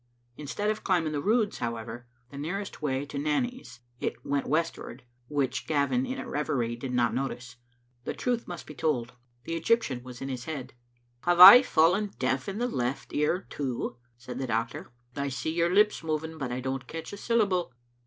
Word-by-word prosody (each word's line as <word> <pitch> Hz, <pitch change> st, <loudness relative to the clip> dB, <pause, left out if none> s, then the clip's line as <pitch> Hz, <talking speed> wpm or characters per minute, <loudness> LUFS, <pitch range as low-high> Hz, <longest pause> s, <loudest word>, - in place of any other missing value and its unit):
In 150 Hz, +1 st, -8 dB
stead 205 Hz, +8 st, 0 dB
of 215 Hz, -, -5 dB
climbing 170 Hz, -5 st, +1 dB
the 145 Hz, -1 st, -2 dB
Roods, 215 Hz, +3 st, +1 dB
however, 115 Hz, 0 st, -5 dB, 0.2 s
the 140 Hz, -, -9 dB
nearest 190 Hz, +7 st, -4 dB
way 135 Hz, -2 st, -1 dB
to 140 Hz, 0 st, -5 dB
Nanny's, 155 Hz, -, -2 dB, 0.2 s
it -, -, -4 dB
went 140 Hz, -1 st, -1 dB
westward, 155 Hz, -4 st, -2 dB, 0.2 s
which 140 Hz, -2 st, -1 dB
Gavin, 160 Hz, -, +1 dB
in 260 Hz, +1 st, -3 dB
a -, -, -6 dB
reverie, 125 Hz, -5 st, -1 dB
did 125 Hz, +2 st, -5 dB
not 125 Hz, -1 st, +2 dB
notice. 125 Hz, -2 st, -4 dB, 0.5 s
The -, -, -3 dB
truth 245 Hz, -2 st, -1 dB
must 175 Hz, -2 st, -7 dB
be 150 Hz, -, -9 dB
told. 125 Hz, -4 st, -1 dB, 0.3 s
The 165 Hz, -, -4 dB
Egyptian 165 Hz, -, +1 dB
was 125 Hz, 0 st, -10 dB
again 135 Hz, +2 st, -5 dB
in -, -, -2 dB
his 125 Hz, -1 st, -5 dB
head. 150 Hz, -5 st, -6 dB, 0.2 s
'' 120 Hz, 0 st, -41 dB
Have 175 Hz, 0 st, +3 dB
I 195 Hz, +7 st, +13 dB
fallen 190 Hz, -2 st, +2 dB
deaf 130 Hz, +2 st, -1 dB
in 195 Hz, -, -4 dB
the 245 Hz, +2 st, 0 dB
left 125 Hz, -, -3 dB
ear, 150 Hz, +6 st, +1 dB
too?" 125 Hz, -3 st, -3 dB, 0.2 s
said 125 Hz, +1 st, -7 dB
the 135 Hz, -, -2 dB
doctor. 115 Hz, 0 st, -2 dB
" 120 Hz, +1 st, -36 dB
I 140 Hz, 0 st, -1 dB
see 135 Hz, +4 st, -3 dB
your 170 Hz, 0 st, +2 dB
lips 210 Hz, 0 st, +3 dB
moving, 160 Hz, 0 st, -3 dB
but 130 Hz, -3 st, -3 dB
I 125 Hz, +1 st, -3 dB
don't 130 Hz, 0 st, -3 dB
catch 165 Hz, +3 st, -7 dB
a -, -, -6 dB
syllable." 200 Hz, -, +1 dB
145 Hz, 200 wpm, -28 LUFS, 125-180 Hz, 0.5 s, I